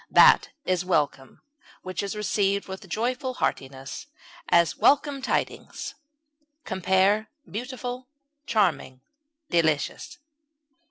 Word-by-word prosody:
That - - +7 0.2
is 185 -1 +1
welcome 150 -6 -1 0.4
which 185 -2 -3
is 200 +1 -4
received 200 -1 0
with 190 0 -8
joyful 250 +6 -1
heartiness; 135 - -3 0.4
as, 170 -1 +4
welcome 285 -1 +3
tidings. - - -2 0.7
Compare 190 +3 +2 0.2
BEAUTIFUL; 250 +2 -5 0.4
CHARMING; 155 - +1 0.5
DELICIOUS. 160 -4 0
190 Hz, 90 wpm, -26 LUFS, 170-235 Hz, 0.7 s, That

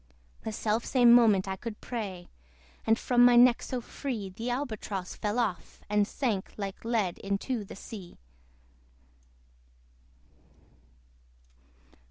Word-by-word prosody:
The - - -4
self 220 +1 -1
same 245 -3 +5
moment 215 -5 +5
I 190 - -2
could 215 +2 -7
pray; 195 -7 -5 0.6
And 225 0 +4
from 245 -1 +3
my 245 0 +7
neck 245 0 +6
so 255 -2 -4
free 230 -6 -5
The 225 +6 -5
Albatross 220 -7 -4
fell 210 +2 -2
off, 220 -7 -2
and 210 -1 +3
sank 220 -8 -2
Like 200 -2 -5
lead 220 -6 -1
into 205 +4 -2
the 195 - -10
sea. 195 -3 -10
220 Hz, 120 wpm, -29 LUFS, 195-240 Hz, 0.6 s, my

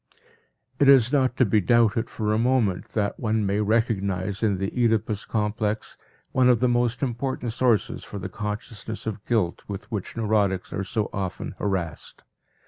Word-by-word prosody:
It 140 - +5
is 130 -2 +6
not 130 -3 +2
to 130 - +5
be 105 0 +3
doubted 115 +3 +3
for 105 -1 -1
a 110 - +2
moment 115 -6 +1
that 105 -2 -1
one 110 -2 0
may 100 +2 +1
recognize 100 -3 0
in 105 -4 +2
the 95 +1 -2
Oedipus 110 -3 +1
complex 105 0 -2 0.4
one 130 -1 +4
of 120 -3 +4
the 125 - +3
most 120 +1 +1
important 125 -2 -2
sources 120 -4 +1
for 105 - -7
the 95 - -4
consciousness 105 0 -6
of 110 -2 -4
guilt 105 -8 0
with 100 +3 -7
which 105 +1 -4
neurotics 105 -4 +1
are 100 - -2
so 105 +1 -1
often 95 -2 -4
harassed. 90 -6 -3
110 Hz, 165 wpm, -25 LUFS, 100-120 Hz, 0.4 s, is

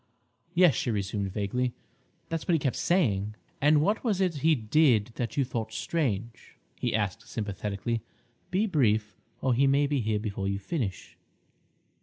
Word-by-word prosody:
"Yes," 175 -4 +6
she 120 - -1
resumed 100 -2 -2
vaguely, 120 +5 -1 0.5
"that's 165 -4 -4
what 175 - +3
he - - +5
kept 135 -2 0
saying." 105 - +1 0.3
"And 150 +1 +5
what 205 +6 +1
was 215 -6 +1
it 180 -5 +1
he 160 +3 +4
did 120 -1 +3
that 120 +2 -4
you 140 - +3
thought 115 -3 -4
strange?" 115 -7 -2 0.2
he - - -1
asked 105 +1 -2
sympathetically. 105 +1 -3 0.5
"Be 195 +4 +2
brief, 110 - +1 0.3
or 130 - +2
he 135 +3 +3
may 140 +1 +4
be 140 -2 0
here 110 -1 0
before 100 -2 -3
you 100 0 0
finish." 100 - -4
120 Hz, 160 wpm, -28 LUFS, 105-150 Hz, 0.5 s, Yes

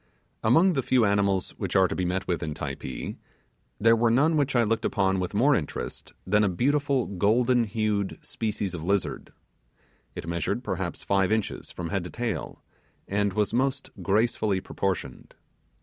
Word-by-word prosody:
Among 165 +12 +5
the 135 - +1
few 125 -2 +3
animals 100 -2 +1
which - - -3
are 95 -1 +6
to - - -4
be 90 - -1
met 90 +2 -2
with 85 -3 -1
in 75 -1 -3
Typee, 65 - -5 0.6
there 115 +2 +5
was 115 0 +3
none 150 +7 +3
which 145 -2 +1
I 120 - +5
looked 115 0 0
upon 95 -1 +1
with 90 +2 -3
more 135 +8 +4
interest 75 - -4
than 105 +3 +3
a 105 - +3
beautiful 140 +6 +1
golden 115 +6 +2
hued 105 -2 -1
species 105 -4 -3
of 80 -3 -5
lizard. 100 +1 -1 0.8
It - - -6
measured 85 -1 -2
perhaps - - -3
five 95 0 +2
inches 110 -1 -2
from 85 -2 -5
head 95 +1 -1
to - - -6
tail, 115 -8 -4 0.4
and 100 0 0
was 105 0 0
most 135 +2 0
gracefully 105 +1 +1
proportioned. 95 0 -4
105 Hz, 165 wpm, -26 LUFS, 95-120 Hz, 0.8 s, are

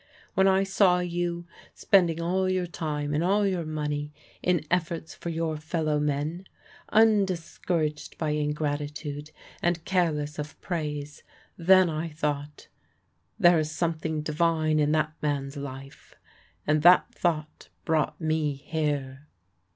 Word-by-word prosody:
When 190 0 +4
I 190 0 +4
saw 195 -2 +3
you 175 -1 -2 0.3
spending 175 -4 +3
all 185 +3 0
your 185 -1 0
time 150 -4 -3
and 155 +3 +1
all 200 +3 +3
your 180 -5 -1
money 150 -1 -3 0.3
in 175 -4 +1
efforts 170 -2 -1
for 170 - -6
your 165 -1 -2
fellow 155 -1 -1
men, 150 +5 -2 0.5
undiscouraged 180 -7 +1
by 155 -2 -1
ingratitude, 150 0 -3 0.3
and 175 -1 0
careless 150 -5 0
of 150 0 -6
praise, 150 -4 -4 0.3
then 185 +2 +5
I 160 +1 -3
thought, 150 -1 -4 0.7
'There 175 -1 +6
is 155 -1 -1
something 160 -1 -2
divine 155 0 +1
in 150 0 +2
that 155 0 +1
man's 140 -1 -2
life,' 135 -1 -9 0.5
and 150 0 +2
that 175 +3 +6
thought 155 -3 -2 0.2
brought 155 -1 0
me 155 -2 0
here." 145 -2 -3
155 Hz, 130 wpm, -27 LUFS, 150-175 Hz, 0.7 s, There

